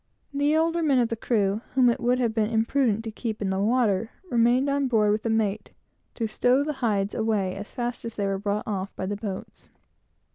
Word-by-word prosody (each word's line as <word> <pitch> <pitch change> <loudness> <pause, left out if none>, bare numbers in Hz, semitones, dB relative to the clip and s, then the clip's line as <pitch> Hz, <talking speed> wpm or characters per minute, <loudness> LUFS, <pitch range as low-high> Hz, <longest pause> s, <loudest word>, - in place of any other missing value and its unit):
The 290 +2 +2
older 330 +1 +1
men 290 -5 +3
of 240 -2 +2
the 230 - -1
crew, 210 -2 0
whom 255 -2 +5
it 235 - +2
would 245 +1 +2
have 235 -3 0
been 220 -1 +2
dangerous 225 0 +1
to 225 - -4
have - - -29
kept 220 -3 -4
in 190 - 0
the 190 - -1
water, 220 -1 +2 0.2
remained 240 +3 +3
on 280 -1 +1
board 215 -4 +3
with 215 +1 0
the 230 - -2
mate, 220 -2 0 0.5
to 230 - -2
stow 250 +5 +2
the 300 +1 -2
hides 205 -4 0
away, 215 -4 0
as 200 +1 -8
fast 240 -1 -4
as 230 -1 -6
they 200 - -1
were 195 0 -1
brought 205 +1 -2
off 195 -2 -3
by 190 - -4
the 205 +2 -2
boats. 200 -2 -7
225 Hz, 225 wpm, -26 LUFS, 205-250 Hz, 0.5 s, whom